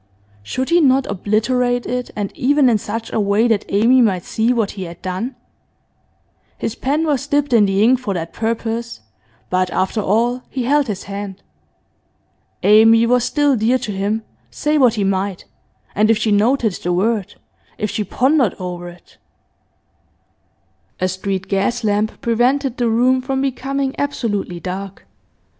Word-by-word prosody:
Should 255 - -3
he 345 0 +5
not 270 -2 +3
obliterate 245 +5 0
it, 250 0 -3
and 205 -2 -4
even 280 0 +3
in 220 - +2
such 225 +3 -5
a - - +1
way 205 +3 +2
that 220 -3 +1
Amy 235 +6 +4
might 190 -7 +1
see 225 +2 0
what 225 -5 0
he 190 -2 -6
had 170 0 -10
done? 190 +8 -4 1.2
His 220 - -3
pen 290 +6 -1
was 285 -3 -1
dipped 290 -2 0
in 215 -3 +5
the 195 +1 +2
ink 250 +3 +4
for 210 -6 -3
that 165 -1 -5
purpose, 230 - -3 0.5
but 185 0 +1
after 190 +5 -1
all 235 +5 +1
he 260 - -3
held 285 +2 +2
his 200 -3 -4
hand. 200 -1 -7 1.2
Amy 225 +2 +6
was 245 +1 +2
still 290 0 +2
dear 235 +3 +2
to 240 -4 -5
him, 205 +3 -2 0.3
say 300 +1 -1
what 245 -4 +4
he 205 - 0
might, 195 -1 -2 0.5
and 215 +2 +2
if 225 - +4
she 215 0 0
noted 220 +1 +2
the 180 - -1
word 205 +2 0 0.4
if 210 - -2
she 215 - -2
pondered 255 - +1
over 175 -1 -6
it 175 0 -18 1.8
A 185 - +1
street 190 0 -3
gas 210 +5 0
lamp 210 0 0
prevented 250 +3 +1
the 240 -2 +1
room 250 +3 +3
from 265 +1 -2
becoming 270 0 -2
absolutely 210 -10 -2
dark. 190 +2 -6
225 Hz, 160 wpm, -19 LUFS, 200-255 Hz, 1.8 s, Amy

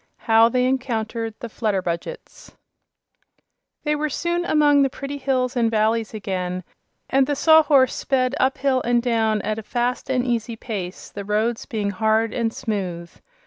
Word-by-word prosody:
How 225 0 +5
They 250 +1 +1
Encountered 230 -4 -2
the 235 - -4
Flutterbudgets 195 - -4 1.3
They 300 0 +1
were 300 +1 -1
soon 345 +4 -1
among 295 -3 +4
the 270 - +3
pretty 280 +2 -6
hills 260 -1 0
and 235 -2 +2
valleys 220 0 +1
again, 185 -3 -4 0.4
and 270 0 +2
the 290 - 0
Sawhorse 295 -4 +5
sped 255 -1 0
up 260 +1 +2
hill 265 -1 +1
and 240 0 +1
down 220 -3 +1
at 215 +1 -2
a - - -5
fast 245 +4 -2
and 255 -1 +1
easy 235 -1 -1
pace, 200 -5 -6
the 200 - -6
roads 215 +3 -1
being 210 -3 -2
hard 220 +3 +1
and 230 -2 0
smooth. 185 -8 -4
235 Hz, 155 wpm, -22 LUFS, 215-265 Hz, 1.3 s, How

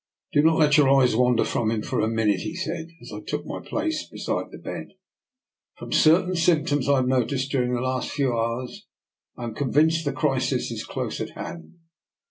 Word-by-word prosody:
" - - -42
Do 145 - +5
not 160 +1 +4
let 150 -1 +4
your 145 -3 +5
eyes 135 -4 +4
wander 125 -1 +3
from 110 -2 0
him 110 -1 -1
for - - -2
a 110 - +1
minute," 110 -4 +1
he 160 - -5
said, 170 -3 -4 0.2
as 120 - -10
I 105 - -5
took 150 +6 -4
my - - -5
place 310 0 -2
be - - -11
side - - -2
the - - -10
bed. - - -7 0.4
" 255 - -53
From - - -9
certain 180 +4 +4
symptoms 155 -5 +2
I 140 - +5
have 130 -2 +1
noticed 130 +1 0
during 125 -2 +1
the 120 - -2
last 130 0 -1
few 135 -4 0
hours, 115 +2 -3 0.5
I 125 - -7
am 115 -2 -4
convinced 155 +6 +2
the 145 - -1
crisis 135 -4 0
is - - -4
close - - -4
at - - -6
hand. 80 -1 -8
135 Hz, 215 wpm, -24 LUFS, 120-155 Hz, 0.5 s, Do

